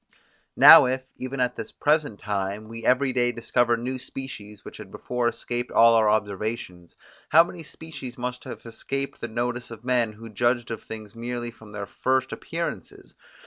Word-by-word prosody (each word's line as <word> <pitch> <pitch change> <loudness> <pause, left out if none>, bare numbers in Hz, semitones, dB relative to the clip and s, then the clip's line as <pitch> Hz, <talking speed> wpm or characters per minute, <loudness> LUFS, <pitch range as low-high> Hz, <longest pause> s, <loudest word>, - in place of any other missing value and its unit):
Now - - +10
if, 130 +1 -1
even 130 +1 -5
at 125 -1 +1
this 110 - -6
present 150 -7 +1
time, 100 +1 -3
we 115 +1 -8
every 130 +1 +3
day 120 -1 +2
discover 120 0 +1
new 130 +2 -4
species, 125 -6 -8
which - - -9
had - - -10
before 125 -1 -2
escaped 120 +1 -3
all 115 0 +6
our 110 -2 +4
observations, 105 -4 -2 0.3
how 165 - +8
many 175 0 -9
species 150 -5 -9
must 125 0 -4
have 130 - -8
escaped 135 +4 -4
the 120 - -3
notice 120 +1 -3
of 115 0 -11
men, 120 -4 +1
who 115 +2 -11
judged 120 +2 0
of 115 - -4
things 110 -2 -9
merely 120 0 -4
from 110 -2 -15
their 105 -1 -5
first 130 +4 0
appearances! - - -6
120 Hz, 175 wpm, -25 LUFS, 110-130 Hz, 0.3 s, Now